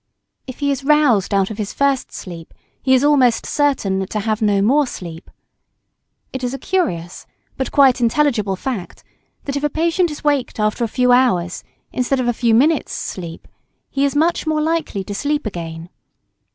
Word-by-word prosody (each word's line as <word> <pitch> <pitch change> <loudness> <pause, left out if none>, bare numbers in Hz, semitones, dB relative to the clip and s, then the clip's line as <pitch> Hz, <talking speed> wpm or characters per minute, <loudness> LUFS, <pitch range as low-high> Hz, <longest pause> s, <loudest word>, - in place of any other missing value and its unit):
If 255 - -8
he 285 0 +2
is 275 0 -3
roused 280 -10 +3
out 195 0 +1
of 215 - -7
his 205 -2 -3
first 280 -2 0
sleep, 170 -3 -9 0.3
he 260 0 +4
is 255 - +2
almost 265 -6 +3
certain 200 -10 0
to 215 - -3
have 215 +1 -1
no 205 -2 +3
more 270 +8 +3
sleep. 170 -7 -8 1.0
It 260 -1 -5
is 250 +2 -2
a - - -5
curious 185 - -2 0.3
but 265 - -3
quite 270 -3 +4
intelligible 230 -5 +1
fact 210 -3 -5 0.4
that, 280 - -4
if 285 - -2
a 295 - +2
patient 335 +4 +1
is 300 0 -8
waked 285 -6 0
after 215 +2 0
a - - +1
few 250 +2 +2
hours' 210 -9 +2 0.3
instead 255 +1 0
of 250 - 0
a 240 - +2
few 230 -1 +2
minutes' 295 +5 +2
sleep, 170 -3 -6 0.4
he 275 - 0
is 280 0 +1
much 330 +2 +1
more 310 -1 +1
likely 310 -10 -1
to 205 - -6
sleep 290 +6 -1
again. 165 -4 -6
250 Hz, 180 wpm, -19 LUFS, 200-290 Hz, 1.0 s, he